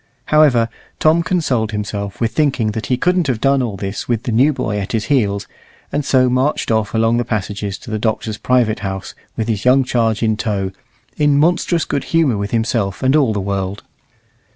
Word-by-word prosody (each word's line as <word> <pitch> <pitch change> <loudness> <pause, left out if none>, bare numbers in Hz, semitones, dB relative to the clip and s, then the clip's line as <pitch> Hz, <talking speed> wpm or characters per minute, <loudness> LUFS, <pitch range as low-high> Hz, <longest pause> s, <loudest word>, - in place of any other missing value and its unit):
However, 135 -7 +5 0.3
Tom 160 +2 +4
consoled 135 -12 0
himself 100 -1 -4
with 115 -1 0
thinking 130 -5 +1
that 110 -1 -4
he 125 - +1
couldn't 180 0 +1
have 125 -5 0
done 135 +2 +2
all 110 -6 -3
this 100 +1 -5
with 120 -2 -1
the 120 - -2
new 130 +7 +4
boy 105 -7 -2
at 100 +2 -5
his 110 -2 0
heels, 100 -6 +1 0.5
and 145 - -1
so 130 -2 +3
marched 130 +2 0
off 110 -1 0
along 115 +1 +2
the 120 - +1
passages 105 -2 -3
to 115 - -11
the 110 - -1
Doctor's 110 -1 -2
private 120 -4 +1
house 95 -1 -5 0.2
with 110 - -1
his 110 -2 -1
young 130 +2 +5
charge 115 -3 0
in 110 -1 +1
tow, 100 -4 -2 0.5
in 145 -1 +3
monstrous 170 +2 +2
good 140 - -2
humour 160 -8 +2
with 100 0 -3
himself 115 -4 -1
and 130 +2 +3
all 140 -7 +3
the 105 - -1
world. 95 0 -3
115 Hz, 200 wpm, -18 LUFS, 105-135 Hz, 0.5 s, However